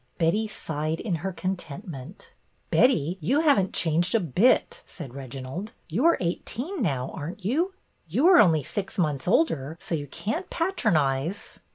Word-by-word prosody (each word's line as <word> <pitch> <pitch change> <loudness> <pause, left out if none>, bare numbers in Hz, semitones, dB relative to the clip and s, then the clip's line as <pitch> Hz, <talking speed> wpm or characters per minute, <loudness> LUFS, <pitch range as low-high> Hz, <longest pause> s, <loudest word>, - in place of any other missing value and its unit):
'^ - - -41
Betty 180 +7 +2
sighed 160 -5 -3
in 210 - -2
her 190 +5 -3
contentment. 175 - -6 0.2
" - - -42
Betty, 185 - +3
you 270 - +2
have 295 -8 +5
n't 190 -1 0
changed 170 +5 +1
a - - +5
bit," 185 - +2
said 145 -9 -9
Regi 135 -1 -7
nald. 185 - -6 0.2
''You 230 - +1
are 335 - +5
eighteen 250 - -3
now, 135 - -1
aren't 175 +6 -7
you?" 335 - 0 0.2
" - - -43
You 280 - +4
are 365 - +8
only 160 -7 +5
six 195 +7 -5
months 150 -6 0
older, 160 - +1
so - - -5
you 145 -3 -2
can't 315 - -4
patronize." 165 - 0
175 Hz, 175 wpm, -26 LUFS, 150-225 Hz, 0.2 s, are